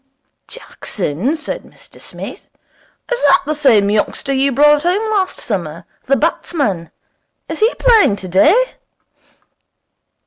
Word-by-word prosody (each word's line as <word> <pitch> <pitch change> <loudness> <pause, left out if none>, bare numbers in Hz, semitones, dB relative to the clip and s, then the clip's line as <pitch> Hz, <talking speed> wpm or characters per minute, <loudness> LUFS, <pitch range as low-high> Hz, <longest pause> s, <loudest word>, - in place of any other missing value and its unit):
'Jackson?' 215 - -4
said 310 -1 -5
Mr - - -17
Smith, - - -9 0.6
'is - - 0
that 285 -1 +4
the 305 - -1
same 255 -9 +3
youngster 215 +6 -1
you 275 +1 +1
brought 295 +3 +4
home 395 +7 0
last 390 -3 -1
summer? 170 -5 -5 0.2
The 275 - +2
batsman? 255 - -2 0.6
Is - - -6
he 440 +2 +3
playing 445 - +4
today?' 205 - +2
280 Hz, 115 wpm, -16 LUFS, -, 0.6 s, that